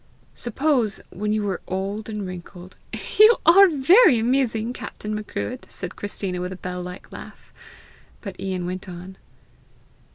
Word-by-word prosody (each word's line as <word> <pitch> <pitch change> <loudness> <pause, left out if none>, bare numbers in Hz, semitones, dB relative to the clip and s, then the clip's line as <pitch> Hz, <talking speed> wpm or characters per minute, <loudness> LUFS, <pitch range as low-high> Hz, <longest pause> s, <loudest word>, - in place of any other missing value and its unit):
Suppose, 245 -3 0
when 210 +2 -2
you 215 0 0
were 195 -3 -2
old 195 +4 -3
and 210 -2 -4
wrinkled, 180 0 -9 0.2
" - - -7
"You 435 +2 +9
are 390 +3 +8
very 325 - +6
amusing, 235 -1 0
Captain 210 -3 -6
Macruadh!" 215 +4 -5
said 180 -1 -7
Christina, 195 -3 -4
with 180 +1 -4
a - - -5
bell 180 0 -5
like 180 +1 -9
laugh. - - -12 0.7
But 195 -4 -8
Ian 185 -2 -3
went 185 +1 -5
on. 180 +2 -9
205 Hz, 150 wpm, -23 LUFS, 185-245 Hz, 0.7 s, You